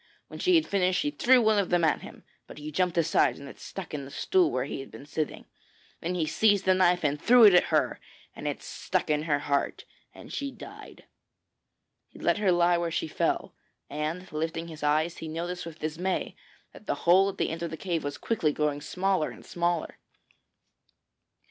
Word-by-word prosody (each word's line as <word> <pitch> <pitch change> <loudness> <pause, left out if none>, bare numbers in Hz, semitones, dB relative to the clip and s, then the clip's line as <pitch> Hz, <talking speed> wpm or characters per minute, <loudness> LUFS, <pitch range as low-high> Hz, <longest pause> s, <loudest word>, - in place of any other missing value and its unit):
When - - -9
she 365 -1 +3
had 320 - +4
finished 185 -2 +1
she 295 - 0
threw 255 -3 +4
one 215 -1 +4
of 195 - -1
them 175 -1 +2
at 160 - +2
him, - - -12 0.2
but - - -12
he 150 +1 -7
jumped 180 +2 0
aside 150 -6 +3
and 140 - -10
it - - -12
stuck 190 -5 -8
in 145 -2 -4
the 135 - -9
stool 360 - +2
where 130 - -1
he 145 - -5
had 135 - -8
been 140 - -11
sitting. 150 +1 -4 0.5
Then 175 +2 -3
he 165 -3 0
seized 200 +5 +2
the 190 - +5
knife 180 -2 +3
and 145 0 0
threw 245 0 +6
it 205 -3 +9
at 180 - +6
her, - - 0 0.4
and - - -6
it - - -4
stuck - - -2
in 150 0 +1
her 150 -3 +2
heart 140 0 -1 0.3
and - - -12
she 280 - -3
died. - - -12 1.0
He - - -17
let - - +1
her 200 -3 +3
lie 175 0 +3
where 170 -1 -1
she 165 - -2
fell, - - -1 0.4
and 155 +5 -4
lifting 165 +2 -3
his 155 -1 -10
eyes 155 +3 +1
he 160 - -6
noticed 170 +2 -4
with 165 -1 -9
dismay 165 +5 -3 0.4
that 215 - -15
the - - 0
hole 190 +3 +6
at 195 - -7
the - - 0
end 165 +1 -5
of 170 - -2
the 160 - -6
cave 170 -3 -2
was 145 0 -4
quickly 185 -10 0
growing 150 -1 -1
smaller 185 0 0
and - - -13
smaller. 175 -1 -2
170 Hz, 210 wpm, -28 LUFS, 155-190 Hz, 1.0 s, it